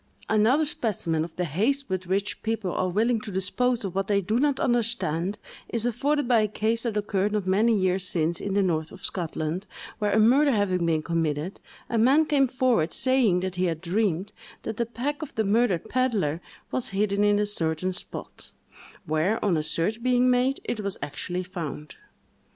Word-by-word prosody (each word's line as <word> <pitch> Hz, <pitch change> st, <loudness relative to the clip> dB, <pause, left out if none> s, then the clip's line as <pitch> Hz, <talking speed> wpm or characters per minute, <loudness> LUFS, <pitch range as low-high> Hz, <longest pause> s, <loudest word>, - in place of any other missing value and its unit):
Another 225 Hz, +8 st, +3 dB
specimen 180 Hz, -, -1 dB
of 165 Hz, -, -8 dB
the 180 Hz, -, -1 dB
haste 230 Hz, -, 0 dB
with 185 Hz, -1 st, -3 dB
which 195 Hz, +2 st, -1 dB
people 220 Hz, -4 st, -2 dB
are 185 Hz, -, 0 dB
willing 220 Hz, +4 st, +1 dB
to 215 Hz, -, -7 dB
dispose 215 Hz, +5 st, 0 dB
of 190 Hz, -, -4 dB
what 195 Hz, 0 st, -1 dB
they 200 Hz, -1 st, +3 dB
do 215 Hz, +5 st, 0 dB
not 285 Hz, 0 st, +2 dB
understand, 215 Hz, -, 0 dB, 0.3 s
is 230 Hz, -1 st, -1 dB
afforded 280 Hz, +4 st, 0 dB
by 240 Hz, -2 st, +5 dB
a 215 Hz, -, +2 dB
case 220 Hz, +2 st, -1 dB
that 225 Hz, -3 st, -2 dB
occurred 205 Hz, 0 st, 0 dB
not 210 Hz, -3 st, 0 dB
many 215 Hz, +5 st, +3 dB
years 185 Hz, -1 st, 0 dB
since 165 Hz, -1 st, 0 dB
in 200 Hz, -1 st, -2 dB
the 200 Hz, -, +3 dB
north 160 Hz, -3 st, 0 dB
of -, -, -8 dB
Scotland, 170 Hz, +1 st, -3 dB, 0.3 s
where 210 Hz, -1 st, +1 dB
a -, -, +2 dB
murder 265 Hz, +7 st, +5 dB
having 185 Hz, -5 st, +1 dB
been 160 Hz, -2 st, +1 dB
committed, 165 Hz, +1 st, -2 dB, 0.3 s
a 230 Hz, -, 0 dB
man 275 Hz, +7 st, +5 dB
came 280 Hz, -3 st, +3 dB
forward, 250 Hz, -10 st, +1 dB
saying 250 Hz, -9 st, +2 dB
that 185 Hz, -1 st, -3 dB
he 185 Hz, -, +2 dB
had 165 Hz, -3 st, -1 dB
dreamed 190 Hz, +1 st, -1 dB, 0.3 s
that 220 Hz, -, -4 dB
the 235 Hz, -, 0 dB
pack 260 Hz, +6 st, -3 dB
of 310 Hz, -, -7 dB
the 220 Hz, -, +1 dB
murdered 215 Hz, -2 st, +1 dB
pedlar 215 Hz, -, 0 dB, 0.3 s
was 255 Hz, -, -2 dB
hidden 200 Hz, +1 st, +1 dB
in 205 Hz, 0 st, +4 dB
a 210 Hz, -, +2 dB
certain 180 Hz, -2 st, -1 dB
spot; 180 Hz, -, -9 dB, 0.5 s
where, 155 Hz, +8 st, +1 dB
on 190 Hz, -4 st, +3 dB
a 155 Hz, -, +1 dB
search 170 Hz, +8 st, -2 dB
being 250 Hz, 0 st, +3 dB
made, 255 Hz, +2 st, +2 dB
it 225 Hz, -, -3 dB
was 200 Hz, -2 st, -3 dB
actually 170 Hz, +5 st, -4 dB
found. 165 Hz, -5 st, -7 dB
205 Hz, 190 wpm, -26 LUFS, 180-235 Hz, 0.5 s, by